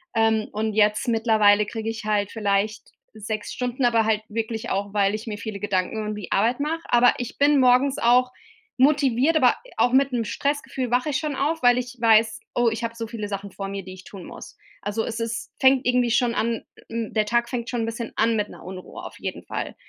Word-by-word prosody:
Ähm, 225 -1 +2
und 215 +1 -2
jetzt 210 +1 +2
mittlerweile 220 -3 +4
kriege 220 +1 -4
ich 225 0 -5
halt 210 -2 0
vielleicht 210 0 -1 0.2
6 215 0 -5
Stunden, 250 +1 -2
aber 230 -2 +3
halt 215 -1 +1
wirklich 225 0 -3
auch, 200 +1 -2
weil 200 0 +2
ich 215 - -7
mir 215 -3 -5
viele 215 -2 -6
Gedanken 205 +2 -1
um 210 0 -3
die 210 -2 -8
Arbeit 230 +6 +2
mache. 315 +3 -2
Aber 240 +1 +5
ich 245 0 -6
bin 285 0 +4
morgens 255 +2 +4
auch 250 +2 +3 0.5
motiviert, 280 +1 +3
aber 255 -5 +4 0.2
auch 245 - +3
mit 275 +1 +4
'nem 235 -2 -1
Stressgefühl 270 +1 -2
wache 250 +4 +1
ich 280 - 0
schon 300 -2 -3
auf, 300 +2 -1
weil 245 0 +5
ich 250 0 -7
weiß: 225 -1 +3
„Oh 240 -1 +3
ich 225 +1 -5
habe 230 0 -2
so 230 -1 -5
viele 215 -2 -5
Sachen 200 0 -5
vor 195 +1 -6
mir, 195 0 -5
die 185 +1 -9
ich 185 0 -12
tun 190 -2 -11
muss.“ - - -11 0.3
Also 205 +2 -2
es 230 0 -4
ist 230 0 -4
fängt 265 0 +4
irgendwie 250 -1 +2
schon 240 0 +2
an, 230 0 -1 0.3
hm 230 -1 -4
der 215 -1 +2
Tag 235 +2 0
fängt 240 -2 -4
schon 240 -2 -1
'n - - -1
bisschen 230 0 -5
an 225 +1 +2
mit 210 -1 -1
'ner - - -13
Unruhe 185 0 -9
auf - - -9
jeden - - -5
Fall. - - -5
230 Hz, 225 wpm, -24 LUFS, 210-245 Hz, 0.5 s, Aber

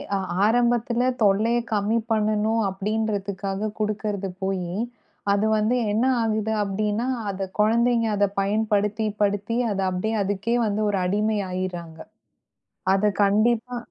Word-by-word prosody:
அ - - +2 0.3
ஆரம்பத்துல 240 +1 +2 0.2
தொல்லைய 215 +4 +3
கம்மி 210 +2 +1
பண்ணனும் 215 +1 +1
அப்டின்றதுக்காகக் 200 0 -2
குடுக்கறது 210 -2 -2
போயி, 185 -2 -2 0.6
அது 200 +2 +1
வந்து 215 +3 +1 0.2
என்ன 220 +4 +1 0.2
ஆகுது 220 -1 0
அப்டின்னா 210 +4 -1 0.2
அந்தக் 190 -1 -5
கொழந்தைங்க 230 +2 +3
அதப் 200 0 0
பயன்படுத்தி 210 +1 0 0.2
படுத்தி 205 +3 0
அது 195 -1 -1
அப்டியே 185 +5 -2
அதுக்கே 205 +4 -1
வந்து 210 +1 -1
ஒரு 200 -2 0
அடிமை 210 +3 +1
ஆயிர்றாங்க. 175 -3 -4 1.0
அதக் 205 +1 +1
கண்டிப்பா 230 +4 +2
210 Hz, 115 wpm, -24 LUFS, 195-220 Hz, 1.0 s, தொல்லைய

